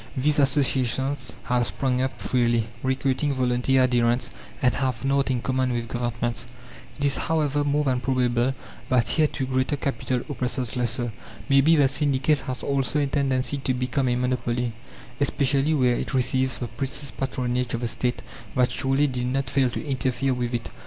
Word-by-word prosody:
These 145 +3 +2
associations 135 -1 +1
have 125 0 +1
sprung 130 -2 0
up 130 0 -2
freely, 120 -3 +1 0.2
recruiting 135 +2 0
volunteer 130 +1 +2
adherents, 120 0 +2 0.3
and 125 -1 +3
have 130 -2 -2
nought 140 0 +2
in 125 -2 -1
common 130 -1 0
with 120 -1 -2
governments. 120 0 -2 0.5
It 145 - -1
is, 140 - +2
however, 150 -3 +1
more 145 +1 +1
than 130 -3 +1
probable 125 0 +1 0.3
that 125 -2 +2
here 155 -2 +3
too 135 - -3
greater 130 +2 0
capital 130 -2 -2
oppresses 125 -3 -2
lesser. 120 -1 0 0.4
Maybe 140 +4 +5
the 145 -3 +5
syndicate 140 +1 +2
has 130 -1 -4
also 140 +1 0
a 145 - +2
tendency 135 -1 0
to 130 -2 -1
become 125 +2 0
a 120 - +2
monopoly, 125 -1 -1 0.5
especially 140 +2 +2
where 125 -3 +3
it - - -3
receives 130 +1 +1
the 120 - -4
precious 135 +2 -5
patronage 125 -2 -2
of 120 - -4
the 120 - 0
State 125 +1 -2 0.3
that 125 -1 +3
surely 135 +3 +1
did 125 -3 -2
not 135 +2 -1
fail 135 -2 +3
to 120 - -5
interfere 130 -1 0
with 125 -1 -2
it. 115 - -4
130 Hz, 170 wpm, -25 LUFS, 125-135 Hz, 0.5 s, Maybe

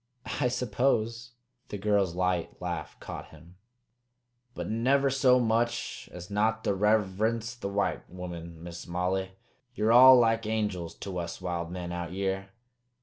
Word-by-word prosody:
"I - - +3
suppose." 120 -1 0 0.4
The 105 - -4
girl's 100 -3 +1
light 90 -2 -1
laugh 85 -4 -5
cut - - -7
him. 85 +2 -17 1.0
"But - - -4
never 135 +5 +2
so 130 -2 +4
much 115 0 -1
as 90 +2 -9
not 110 +2 +1
to - - +1
rever'nce 110 +3 +1
the 100 - -3
white 100 0 -1
woman, 85 -2 -8
Miss 85 0 -8
Molly. 95 +2 -1 0.4
Ye're 110 0 +2
all 130 +2 +10
like 115 -2 +2
angels 105 -7 -2
to 95 -2 -4
us 85 0 -5
wild 85 -2 -3
men 90 0 -5
out 85 0 -4
yere. 95 0 -2
100 Hz, 145 wpm, -29 LUFS, 90-115 Hz, 1.0 s, all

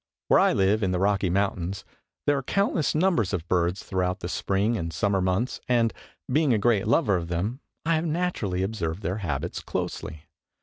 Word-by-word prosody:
Where - - +6
I - - +5
live, 100 +3 +2
in 95 - +1
the 90 - 0
Rocky 100 -1 +2
Mountains, 95 0 -1 0.4
there 145 - +3
are 135 - -1
countless 170 +1 0
numbers 155 - +2
of 90 -2 -2
birds 90 +1 +1
throughout 95 +1 -1
the 85 - -4
spring 100 +6 0
and 85 -6 -3
summer 100 +2 +1
months 95 +7 0
and, 115 -2 +3 0.3
being 145 0 +3
a - - +3
great 105 -2 +2
lover 110 - +3
of 85 -1 -4
them, 95 +9 -2 0.3
I 165 - +2
have 160 - -2
naturally 150 - -1
observed 95 -4 -3
their 90 +5 -1
habits 75 -10 -3
closely. 80 -1 -4
100 Hz, 185 wpm, -26 LUFS, 90-120 Hz, 0.4 s, Where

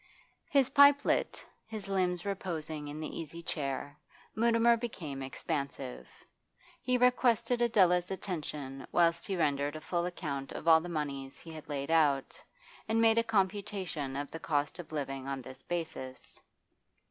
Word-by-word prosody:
His 270 -3 +3
pipe 285 0 +7
lit, - - 0 0.2
his 215 -2 -6
limbs 180 -2 0
reposing 160 -6 -4
in 145 +1 -6
the 155 - -5
easy 165 +1 -7
chair, 145 -1 -3 0.4
Mutimer 235 +1 +4
became 170 - -5
expansive. 140 -1 -4 0.7
He 250 -1 +2
requested 245 -1 +3
Adela's 180 -6 +4
attention 150 -8 -5
whilst 170 -1 +3
he 195 - -1
rendered 145 -2 +1
a - - -4
full 175 +2 -1
account 140 -6 -4
of - - -7
all 160 -1 +8
the 175 - -6
moneys 140 -4 -4
he 165 - -11
had 155 -1 -10
laid 140 +1 -3
out, 145 -4 +2 0.4
and 225 +1 +2
made 225 0 +5
a - - +2
computation 195 -9 -1
of 145 +1 -4
the 165 - -6
cost 145 0 -1
of 170 - -8
living 135 -3 -4
on 135 -1 -2
this 130 +1 -10
basis. 160 -7 -5
165 Hz, 150 wpm, -32 LUFS, 145-200 Hz, 0.7 s, all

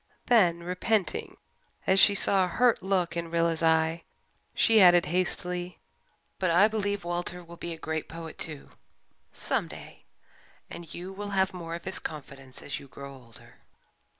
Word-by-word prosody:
Then, 175 -8 +3
repenting, 185 +3 -1 0.5
as 190 +1 +4
she 200 +1 +7
saw 195 -1 +4
a - - 0
hurt 235 +6 +2
look 185 -2 0
in 170 -1 -3
Rilla's 170 -1 0
eye, 160 0 +2 0.5
she 225 -2 +5
added 175 -2 +7
hastily, 180 +1 -2 0.6
"But 185 - +1
I 180 +5 +6
believe 205 -3 -2
Walter 175 +1 -3
will 170 0 -12
be 170 0 -6
a 165 - -5
great 160 -1 -4
poet, 165 0 -9
too 155 -3 -4 0.6
some - - -1
day - - -12 0.7
and 170 -2 -9
you 185 +2 -7
will 205 +1 -6
have 190 -1 +1
more 170 -2 -6
of 170 - -9
his 190 - -1
confidence 135 -3 -8
as 145 - -4
you 140 - -13
grow 140 +1 -10
older." 120 -4 -16
175 Hz, 160 wpm, -28 LUFS, 165-190 Hz, 0.7 s, she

